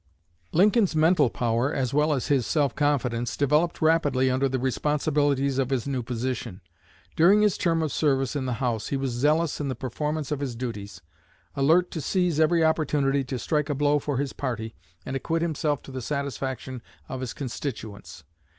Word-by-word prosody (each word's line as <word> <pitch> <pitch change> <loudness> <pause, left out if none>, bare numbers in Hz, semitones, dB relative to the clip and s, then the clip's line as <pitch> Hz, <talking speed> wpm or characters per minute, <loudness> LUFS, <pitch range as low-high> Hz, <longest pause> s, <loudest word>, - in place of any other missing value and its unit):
Lincoln's 200 +1 +3
mental 155 -3 +4
power, 120 +1 0
as 130 -4 -1
well 150 +2 +3
as 135 -4 0
his 135 -5 +1
self 145 -5 +1
confidence, 125 -5 0
developed 150 +4 +1
rapidly 145 -5 +3
under 135 +1 +1
the 130 - -1
responsibilities 140 +1 0
of 130 -2 0
his 130 -4 -1
new 135 -2 -1
position. 120 -3 -4 0.5
During 195 +6 +5
his 210 -3 +3
term 165 -2 +1
of 155 - -2
service 135 -3 +1
in 135 -2 -2
the 125 - -1
House 115 -2 -2
he 140 - -1
was 135 -1 -2
zealous 150 +6 +1
in 145 - -2
the 130 - -2
performance 150 +5 -3
of 145 - -1
his 135 -4 -3
duties, 110 -5 -6 0.5
alert 160 +6 +3
to 160 - -4
seize 175 +1 0
every 160 +1 +4
opportunity 145 -3 +1
to 130 0 -4
strike 150 +4 -1
a 145 - 0
blow 145 +1 +2
for 145 -1 -2
his 140 0 -2
party 115 -4 -4 0.3
and 135 - -4
acquit 165 +5 -1
himself 150 -3 -1
to - - -11
the 130 -1 -5
satisfaction 130 -2 -4 0.3
of 130 - -5
his 125 -3 -3
constituents. 115 -6 -6
140 Hz, 180 wpm, -26 LUFS, 130-155 Hz, 0.5 s, During